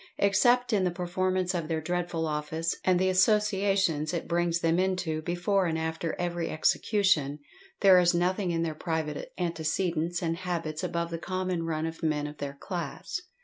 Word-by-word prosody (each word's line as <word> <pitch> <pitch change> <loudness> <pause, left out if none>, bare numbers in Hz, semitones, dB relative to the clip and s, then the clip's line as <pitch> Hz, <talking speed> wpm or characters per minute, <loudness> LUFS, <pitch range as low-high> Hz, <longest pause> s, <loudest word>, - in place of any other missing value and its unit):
Except 240 +5 +3
in 200 -3 +3
the 180 - +2
performance 185 +1 -1
of 170 -3 -2
their 160 -1 -1
dreadful 175 0 -2
office, 155 +2 -2
and 185 -1 +3
the 190 - +2
associations 195 -5 +2
it 170 - -3
brings 170 0 +1
them 165 +1 +2
into, 180 -4 0
before 180 +3 0
and 160 -1 -1
after 160 0 -2
every 175 -1 -2
execution, 155 -3 +2 0.4
there 190 -2 +8
is 175 -1 +4
nothing 180 +2 0
in 165 -1 0
their 160 -2 -2
private 155 -2 -3
antecedents 170 0 -1
and 165 0 -1
habits 170 -4 -3
above 170 0 -2
the 165 - -3
common 185 -2 -2
run 155 -1 -1
of 165 0 -6
men 150 -2 0
of 150 0 -8
their 140 -1 -4
class. 180 - -5
175 Hz, 170 wpm, -28 LUFS, 160-185 Hz, 0.4 s, there